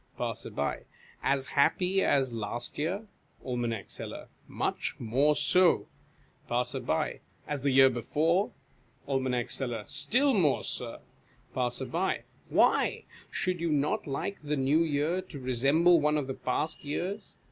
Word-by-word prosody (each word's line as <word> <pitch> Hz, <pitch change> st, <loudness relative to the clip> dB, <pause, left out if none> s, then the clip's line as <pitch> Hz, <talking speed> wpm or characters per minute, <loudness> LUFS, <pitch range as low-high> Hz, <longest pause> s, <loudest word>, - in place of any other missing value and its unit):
Passer. -, -, -3 dB, 0.4 s
As 135 Hz, -1 st, +1 dB
happy 180 Hz, +7 st, +2 dB
as 135 Hz, -3 st, +2 dB
last 115 Hz, +4 st, -3 dB
year? 185 Hz, +8 st, -1 dB, 0.4 s
Aim. 120 Hz, -5 st, -2 dB
Seller. -, -, -7 dB, 0.2 s
Much -, -, -2 dB
more 135 Hz, +7 st, +3 dB
so. 180 Hz, +5 st, +3 dB, 0.6 s
Passer. 125 Hz, +1 st, 0 dB, 0.3 s
As 145 Hz, -2 st, -3 dB
the 140 Hz, -, +1 dB
year 135 Hz, 0 st, +7 dB
before? 160 Hz, -, +1 dB, 0.6 s
Aim. 130 Hz, -3 st, 0 dB
Seller. 120 Hz, -5 st, -1 dB
Still 250 Hz, -, +2 dB
more, 165 Hz, -, +2 dB
Sir. -, -, -3 dB, 0.5 s
Passer. 130 Hz, +8 st, -1 dB, 0.3 s
Why? -, -, +3 dB, 0.3 s
Should 185 Hz, -3 st, -1 dB
you 170 Hz, -, 0 dB
not 145 Hz, 0 st, 0 dB
like 145 Hz, +8 st, -3 dB
the 150 Hz, 0 st, -2 dB
New 135 Hz, +4 st, +3 dB
Year 160 Hz, +3 st, +1 dB
to 180 Hz, -5 st, -10 dB
resemble 140 Hz, +7 st, +3 dB
one 150 Hz, +1 st, +2 dB
of 145 Hz, -, -1 dB
the 135 Hz, -, -4 dB
past 140 Hz, +5 st, -2 dB
years 185 Hz, +8 st, -4 dB
145 Hz, 125 wpm, -29 LUFS, 130-170 Hz, 0.6 s, year